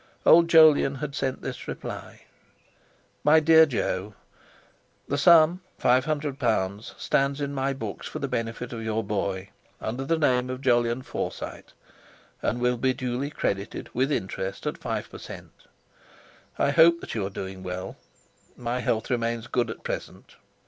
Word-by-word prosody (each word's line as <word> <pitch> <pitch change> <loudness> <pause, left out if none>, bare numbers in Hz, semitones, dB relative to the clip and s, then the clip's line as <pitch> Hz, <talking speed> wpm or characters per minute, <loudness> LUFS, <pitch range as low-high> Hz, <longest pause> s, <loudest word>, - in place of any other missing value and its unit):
Old 170 +1 +7
Jolyon 155 -4 +6
had 140 +1 -5
sent 135 -3 -2
this - - -6
reply: - - -7 1.0
"MY 150 +2 +6
DEAR 160 +1 +7
JO, 105 -6 -2 0.9
"The 140 - -1
sum 170 +2 +6 0.2
(£500) 125 -7 0
stands 140 +1 +1
in 140 -1 -3
my 135 0 0
books 110 -7 -6
for - - -6
the - - -3
benefit 115 +1 -4
of 115 - -5
your 110 0 -1
boy, 100 -2 -3 0.3
under 120 +5 -3
the 165 +4 +1
name 125 -4 +2
of 130 +1 -5
Jolyon 120 -1 +2
Forsyte, - - -6 0.7
and 120 - -1
will 125 0 +1
be 130 +2 +1
duly 125 +3 -2
credited 100 -8 -3
with 130 +4 +1
interest 95 -5 -3
at - - -3
5 - - -4
per - - -9
cent. - - -10 1.0
I 140 - +2
hope 170 +2 +6
that - - -7
you 110 - -1
are 95 - -2
doing 95 -1 -7
well. 90 +1 -5 0.6
My 120 +1 -2
health 115 -1 -1
remains 115 -1 -1
good 120 -1 0
at 115 - -7
present. - - -6
125 Hz, 150 wpm, -26 LUFS, 110-140 Hz, 1.0 s, Old